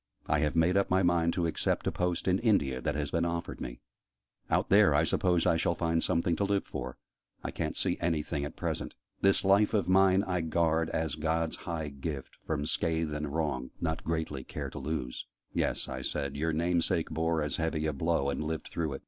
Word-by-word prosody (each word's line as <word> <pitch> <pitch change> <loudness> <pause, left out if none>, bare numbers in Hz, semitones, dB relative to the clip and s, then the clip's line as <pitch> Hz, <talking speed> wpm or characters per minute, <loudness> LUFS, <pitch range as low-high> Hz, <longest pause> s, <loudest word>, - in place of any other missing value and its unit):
I - - +1
have 75 0 0
made 85 +3 +3
up 100 - +2
my 95 +1 +3
mind 85 -1 +3
to 90 - 0
accept 80 - -1
a - - +1
post 90 0 -1
in 95 +1 +3
India, 70 - +2
that 75 0 -1
has 75 -2 -2
been 85 - +1
offered 85 0 -3
me. - - -6 0.7
Out - - +1
there, 100 -7 +6
I 75 - +4
suppose 90 0 +2
I 80 - +4
shall 85 +1 +1
find 80 -1 +1
something 85 -1 +1
to - - +1
live 100 0 +1
for; - - -6 0.5
I - - -3
ca'n't - - -3
see - - 0
anything 80 -3 -1
at 75 - -5
present. - - -3 0.3
'This 100 0 +4
life 100 +3 +4
of 100 - +1
mine 95 +1 +5
I 90 -3 -1
guard, 80 0 +1
as 80 -3 -1
God's 80 +1 0
high 80 -3 -2
gift, 70 0 -6
from 75 -2 -2
scathe 80 -1 0
and 75 0 -2
wrong, 75 -5 -1
Not 80 -1 -2
greatly 80 -4 -2
care - - -6
to - - -6
lose!'" 70 -3 -4 0.3
"Yes," - - 0
I 65 0 -5
said: 70 +1 -3
"your 80 +3 0
name 85 +2 +1
sake 80 0 0
bore 80 -1 0
as 75 - -2
heavy 80 -1 -1
a 75 - 0
blow, 70 -1 +1
and - - -3
lived 80 0 -4
through 80 -4 -2
it." 70 - -5
80 Hz, 215 wpm, -30 LUFS, 75-85 Hz, 0.7 s, there